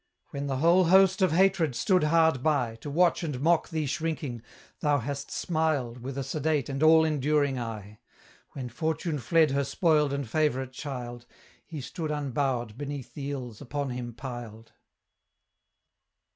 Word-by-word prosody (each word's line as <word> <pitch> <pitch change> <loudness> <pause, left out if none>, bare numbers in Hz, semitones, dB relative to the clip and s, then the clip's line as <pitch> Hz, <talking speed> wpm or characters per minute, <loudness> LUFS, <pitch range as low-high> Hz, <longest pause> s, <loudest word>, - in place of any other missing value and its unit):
When 140 0 -4
the 135 -1 -1
whole 170 +5 +4
host 190 +2 +5
of 185 -3 +4
hatred 175 -5 +3
stood 180 - +2
hard 160 -3 +3
by, 130 -6 +1
To 145 - -8
watch 170 +4 +3
and 150 -7 -3
mock 165 +4 +2
thee 160 -2 -2
shrinking, 145 -5 -3 0.4
thou 145 -1 +2
hast 140 +2 -4
smiled 155 -8 -1
With 130 +2 -6
a 135 - -1
sedate 150 0 -1
and 135 +1 -3
all 160 0 +6
enduring 145 -2 +1
eye; 105 -3 -7 0.5
When 130 -3 -5
Fortune 160 +4 -2
fled 160 +2 +3
her 140 +1 +1
spoiled 150 +1 +2
and 140 -2 -3
favourite 130 -1 0
child, 125 -3 -7 0.4
He 155 -4 -6
stood 155 +4 -5
unbowed 135 -5 -2
beneath 145 -2 -6
the 140 -1 -5
ills 125 -6 -6
upon 140 0 -3
him 120 -1 -5
piled. 120 -3 -8
140 Hz, 155 wpm, -28 LUFS, 125-160 Hz, 0.5 s, all